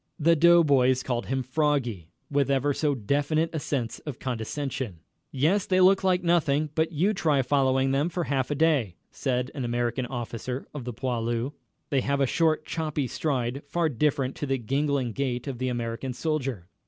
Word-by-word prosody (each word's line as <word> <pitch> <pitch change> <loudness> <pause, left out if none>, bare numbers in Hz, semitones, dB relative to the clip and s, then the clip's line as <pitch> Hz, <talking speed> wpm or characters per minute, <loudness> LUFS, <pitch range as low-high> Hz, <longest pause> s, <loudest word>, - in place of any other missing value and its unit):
The 165 +2 +4
doughboys 145 -6 +5
called 120 -2 -2
him 130 0 -1
"Froggy" 130 - -1 0.2
with 140 -1 +2
ever 140 +1 +2
so 145 0 0
definite 145 +7 0
a 160 - -1
sense 130 -5 -3
of 145 -6 -7
condescension. 125 - -4 0.3
"Yes, 165 +9 +1
they 185 -1 +3
look 190 +1 +5
like 185 -1 +2
nothing 155 -4 +2
but 160 +1 +1
you 180 +7 +1
try 150 -8 +2
following 135 -1 +2
them 140 +5 +1
for 175 0 -2
half 135 -4 -1
a 145 - 0
day," 140 - +2 0.2
said 125 -2 -1
an 135 - -4
American 120 +1 -1
officer 120 +1 -5
of 140 -5 -6
the 125 - -4
"poilus." 120 +1 -2 0.4
They 135 -2 +2
have 140 +2 0
a 135 - +4
short, 155 +2 +1
choppy 155 -3 -2
stride, 130 -1 -2
far 170 +2 +1
different 135 0 0
to 145 - -3
the 135 0 +1
gangling 135 +1 0
gait 125 -1 -2
of 130 -4 -4
the 130 - -1
American 120 +1 -3
soldier. 135 - -2
135 Hz, 180 wpm, -27 LUFS, 125-155 Hz, 0.4 s, doughboys